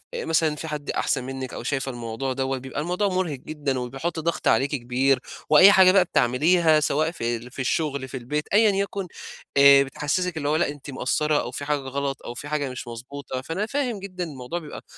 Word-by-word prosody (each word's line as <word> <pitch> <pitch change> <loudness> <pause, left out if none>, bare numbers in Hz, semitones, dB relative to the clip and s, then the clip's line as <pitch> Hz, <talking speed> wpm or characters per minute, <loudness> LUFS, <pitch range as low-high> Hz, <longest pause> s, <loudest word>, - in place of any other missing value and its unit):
مثلًا 160 - +1
في 160 - -6
حد 150 -2 -5
أحسن 125 - 0
منِّك 130 0 -6
أو - - -6
شايفة 135 0 -2
الموضوع 120 +2 -4
دوّة، 135 0 -1
بيبقى 130 +3 -5
الموضوع 180 +5 0
مُرهق 185 -6 -1
جدًا 140 -3 -3
وبيحط 135 +7 -4
ضغط 170 +1 -2
عليكِ 135 +2 +3
كبير، 130 +2 +1 0.3
وأي 185 +7 +9
حاجة 190 -2 +7
بقى 190 -2 +5
بتعمليها 155 +5 +3
سواء 155 +2 +1
في 120 -7 -2
ال 120 +2 -12
في 135 - -11
الشغل 140 0 -1
في 130 - -6
البيت 150 +5 -3
أيًا 215 0 +6
يكن، 195 -1 -2 0.5
آآ 140 0 +8
بتحسّسِك 160 +5 -2
اللي 145 -1 -1
هو 155 - +2
لأ 160 - +1
أنتِ 145 0 -9
مقصّرة 150 +3 0
أو 120 - -6
في 145 +3 -5
حاجة 150 0 +1
غلط، 135 +1 -4
أو 120 - -5
في 145 +4 -7
حاجة 145 -2 -1
مش 125 -1 -7
مضبوطة، 130 +2 -6
فأنا 165 +9 -3
فاهم 250 -4 -2
جدًا 185 -2 -5
الموضوع 145 +1 -5
بيبقى 150 -3 -9
145 Hz, 205 wpm, -24 LUFS, 130-165 Hz, 0.5 s, وأي